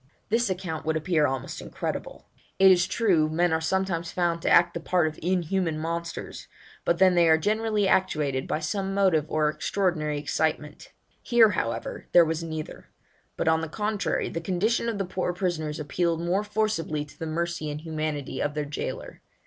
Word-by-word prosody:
This 230 +1 +2
account 180 -4 -3
would 160 0 0
appear 160 -2 +2
almost 130 -2 -4
incredible. - - -5 0.3
It 190 0 +7
is 175 -1 +4
true 175 -9 +2
men 170 +2 +1
are 160 - +1
sometimes 170 0 -1
found 170 -2 0
to - - 0
act 170 0 +5
the - - -3
part 175 0 +1
of 155 0 -3
inhuman 180 -1 0
monsters, 170 +1 -5 0.4
but 170 - +2
then 185 0 +5
they 170 -2 +4
are 160 - +6
generally 210 +3 +1
actuated 150 -9 +1
by 155 - -1
some 195 +4 -2
motive 180 -7 +3
or 155 -1 +1
extraordinary 155 -2 -1
excitement; 150 0 -2 0.3
here, 230 -3 +5
however, 115 - -3
there 175 -1 +8
was 160 +1 -2
neither; 160 -2 -6 0.5
but - - -1
on 160 0 +3
the 160 - -4
contrary, 210 +3 -1
the 165 - -4
condition 205 +7 0
of 225 - -3
the 195 - -1
poor 180 0 -2
prisoners 170 -4 -2
appealed 165 +3 -1
most 190 +5 -1
forcibly 165 -9 -1
to 145 - -18
the 160 - -4
mercy 170 -1 -2
and 150 +1 -5
humanity 155 -3 -3
of 145 0 -1
their 150 -1 -1
jailor. 145 - -6
170 Hz, 180 wpm, -26 LUFS, 155-190 Hz, 0.5 s, there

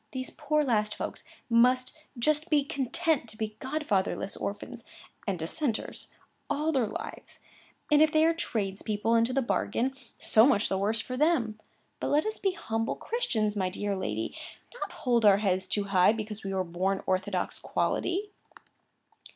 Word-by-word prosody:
These 255 -1 -4
poor 300 0 0
last 215 -5 +1
folks - - -5 0.2
must 250 +2 +3 0.2
just 305 +6 +1
be 295 -2 +4
content 280 0 0
to 215 - -13
be 215 -1 -3
godfatherless 235 -9 -1
orphans, 225 +4 -5 0.4
and 195 -2 0
Dissenters, 220 - -1 0.4
all 305 +2 +1
their 260 -7 +2
lives; - - -7 0.5
and 300 0 +6
if 310 -1 +5
they 310 0 +4
are 330 - +4
tradespeople 210 - -1
into 230 +1 +3
the 270 +1 +1
bargain, 250 +2 0 0.2
so 220 +3 +5
much 215 -7 +3
the 190 - 0
worse 215 +3 +1
for 255 +3 -4
them; 255 -8 +2 0.4
but - - -2
let 295 +2 +2
us 435 0 -3
be 390 -2 +1
humble 225 - -2
Christians, 225 - -1
my 190 -2 0
dear 200 +1 -2
lady, 110 - -3 0.4
and - - -12
not - - -3
hold 240 -3 +1
our 200 -2 +7
heads 190 -2 0
too 205 - 0
high 195 0 +4
because 215 -1 -5
we 195 - -3
were 190 -1 0
born 185 +3 -1
orthodox 185 0 -1
quality." 400 +4 -1
230 Hz, 165 wpm, -29 LUFS, 200-290 Hz, 0.5 s, our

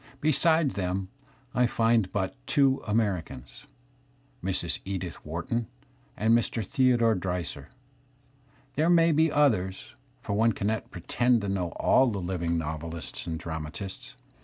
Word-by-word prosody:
Beside 155 +1 +3
them 95 -1 -2
C\(\ 135 0 -32 0.2
I 125 0 +3
find 115 -4 +2
but 95 +1 -1
two 135 -2 +3
Americans, 100 - -2 0.8
Mrs. 90 -2 -1
Edith 95 -3 -5
Wharton 85 +9 -3 0.5
and 110 +3 +4
Mr. 115 -2 0
Theodore 120 -1 +3
Dreiser. 90 -6 -3 1.0
There 155 +5 +2
may 165 -1 +5
be 160 +1 +3
others, 105 -11 +1 0.3
for - - -4
one 110 +2 +3
cannot 110 +2 -2
pretend 120 +7 +1
to 100 - -3
know 90 -3 -1
all 130 - +4
the 110 -4 -1
living 85 -2 -1
novelists 80 +2 -5
and 80 -1 -2
dramatists. 85 - -6
100 Hz, 130 wpm, -28 LUFS, 90-125 Hz, 1.0 s, may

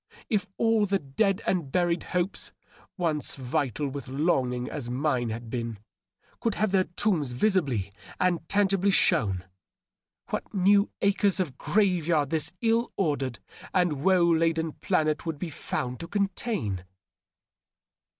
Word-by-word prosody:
If 205 -4 +1
all 225 -2 +3
the 195 +1 +2
dead 195 +8 0
and 170 -8 0
buried 175 0 +1
hopes, 180 +1 -2 0.5
once 160 -5 0
vital 135 +1 -1
with 140 0 -6
longing 130 -3 0
as 135 -6 -5
mine 125 -2 0
had 115 +1 -6
been, 115 -3 -3 0.6
could 230 -3 0
have 215 -2 +1
their 190 -1 +3
tombs 175 -8 -1
visibly 130 - +1 0.3
and 175 -3 0
tangibly 195 -1 +2
shown, 100 - +2 0.8
what - - -4
new 200 +2 +4
acres 200 0 +3
of 165 -8 -1
grave 185 -6 +1
yard 150 -5 +2
this 160 0 +1
ill 230 +1 +2
ordered 140 - 0 0.4
and 175 -7 +2
woe 185 -2 +5
laden 165 -1 +2
planet 155 -4 0
would 160 -2 -2
be 165 +2 -5
found 125 -3 -4
to 170 - -6
contain 195 - -1
165 Hz, 135 wpm, -27 LUFS, 135-195 Hz, 0.8 s, woe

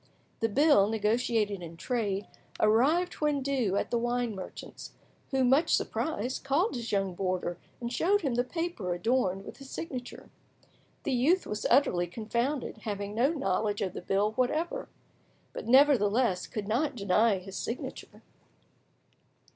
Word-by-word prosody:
The 225 - +1
bill, 275 -4 +5
negotiated 220 -2 0
in 165 -1 -9
trade, 205 -3 -2 0.3
arrived 275 +12 +3
when 295 -2 +1
due 255 -8 0
at - - -1
the 235 - +2
wine 240 -1 -1
merchant's, 190 -2 -9 0.4
who, 265 -1 +1
much 270 +6 +4
surprised, 260 -5 -2
called 285 +10 +1
his 235 -1 -4
young 195 -2 0
boarder 180 -2 -2 0.2
and 240 0 -4
showed 400 +9 +2
him 275 -7 -1
the 245 +1 +2
paper 255 - -3
adorned 195 -1 0
with - - -9
his 275 -1 -12
signature. 255 -7 -7 0.7
The 280 - -1
youth 305 +10 +3
was 210 0 -2
utterly 180 -11 +3
confounded, 235 - -2
having 205 -2 -4
no 240 +5 +3
knowledge 215 - 0
of 185 -2 -3
the - - -6
bill 200 +2 +1
whatever, 310 - -1 0.6
but - - -6
nevertheless 235 -6 +4
could 210 -2 -5
not 265 +6 0
deny 205 0 +3
his 190 +1 -9
signature. 235 - -6
235 Hz, 145 wpm, -29 LUFS, 200-275 Hz, 0.7 s, bill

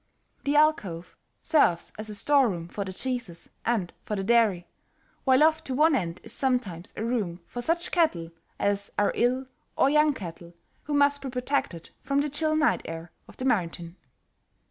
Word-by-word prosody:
The 285 +1 +1
alcove 205 - +1 0.3
serves 180 - +2
as 215 0 -7
a 210 - -5
store 275 +4 +3
room 170 -3 -5
for 200 +3 -4
the 190 - -6
cheeses, 235 -5 -4
and 220 -7 -1
for 210 - -3
the 195 - -2
dairy, 210 -5 +3 0.6
while 260 +1 +5
off 315 0 +3
to 260 - -3
one 310 +3 +4
end 180 -8 -2
is - - -5
sometimes 235 -10 -1
a 220 - -2
room 210 -8 -1
for 245 - -6
such 340 +6 0
cattle 180 - +1 0.3
as 200 0 0
are 205 - +3
ill 255 +2 +1 0.3
or 275 - +4
young 300 0 +4
cattle 170 -3 -9 0.3
who 295 - -2
must 285 0 +3
be 270 - -5
protected 250 - -2
from 280 +1 +1
the 295 -1 -2
chill 310 +1 0
night 310 -1 +2
air 165 +1 -7 0.2
of - - -15
the 255 - -4
mountain. 170 -7 -1
235 Hz, 180 wpm, -27 LUFS, 180-285 Hz, 0.6 s, while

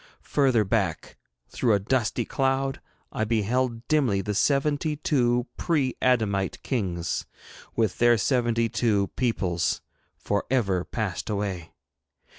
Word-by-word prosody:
Further 130 -6 +4
back, 95 -6 -1 0.3
through 115 - +1
a 100 - +3
dusty 115 +2 0
cloud, 135 0 0 0.3
I - - -1
beheld 115 +2 0
dimly 130 -11 +2
the 105 +2 -3
seventy 145 +6 +1
two 125 -5 +1
pre 145 -7 0
adamite 105 -7 +1
kings, 90 -10 -2 0.5
with 110 -5 0
their 120 0 +5
seventy 120 0 +1
two 105 -4 +1
peoples, 95 -9 0 0.4
for 100 0 -1
ever 100 -9 +1
passed 95 - -4
away. 100 -5 -3
115 Hz, 115 wpm, -26 LUFS, 100-130 Hz, 0.5 s, their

